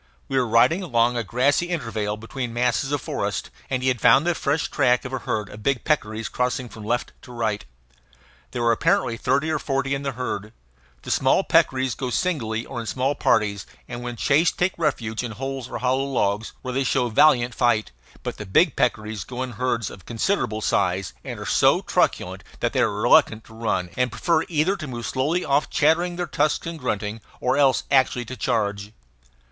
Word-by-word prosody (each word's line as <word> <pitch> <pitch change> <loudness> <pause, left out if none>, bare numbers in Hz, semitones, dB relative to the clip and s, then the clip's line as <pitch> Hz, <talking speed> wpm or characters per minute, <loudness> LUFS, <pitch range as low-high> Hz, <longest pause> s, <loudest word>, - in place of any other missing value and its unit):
We 135 - -3
were 130 -2 +2
riding 125 - +4
along 120 -8 +2
a 120 - -1
grassy 135 - +1
intervale 110 -10 -2
between 120 +2 -5
masses 125 +2 +1
of 145 - 0
forest, - - -3 0.2
and 130 -1 -1
he - - +1
had 125 -3 -1
found 145 - +6
the 175 - +2
fresh 150 -1 0
track 125 -3 +2
of 130 - -6
a 130 - -1
herd 105 -3 -2
of 105 - -11
big 135 +2 0
peccaries 110 -7 -1
crossing 125 0 -2
from 110 0 -10
left 120 +3 -1
to 125 - -13
right. 110 -4 -2 0.9
There 120 - -3
were 115 - +4
apparently 115 +1 +2
thirty 140 +6 0
or 155 - 0
forty 135 -1 -1
in 140 - -2
the 140 -1 -3
herd. 110 -3 -4 0.5
The - - -4
small 135 +8 +3
peccaries 130 -8 +2
go 130 +1 -4
singly 115 -8 -1
or 125 - -6
in 115 - -6
small 130 +6 0
parties, 100 -7 +1 0.2
and 120 0 -6
when 120 0 -5
chased 150 +7 +2
take 180 +1 +1
refuge 120 -9 -1
in 120 -2 -5
holes 135 +1 -5
or - - -4
hollow 130 +2 +1
logs, 110 -5 -1
where 130 -1 -4
they 135 +2 +1
show 125 -2 +1
valiant 125 -1 +4
fight; 120 -3 +1 0.3
but - - -4
the 105 - -6
big 150 - +3
peccaries 110 -4 -1
go 125 +3 -5
in 130 - -5
herds 120 -2 -1
of 95 - -13
considerable 115 - -1
size, 90 - 0
and - - -6
are - - -6
so - - +4
truculent - - 0 0.2
that - - -1
they - - +1
are - - +3
reluctant 110 +1 +4
to 110 - -16
run, 110 -6 -2
and 125 -2 0
prefer 160 +9 +1
either 165 +4 +2
to 155 -5 -6
move 120 -3 -5
slowly 150 +7 0
off 140 +2 +1
chattering 170 +3 +2
their 175 0 -2
tusks 150 -2 0
and 165 -1 -5
grunting, 105 -4 -3 0.2
or 125 - +1
else 140 -2 +3
actually 130 -2 +3
to 130 - -7
charge. 105 -4 -1
125 Hz, 200 wpm, -23 LUFS, 110-140 Hz, 0.9 s, found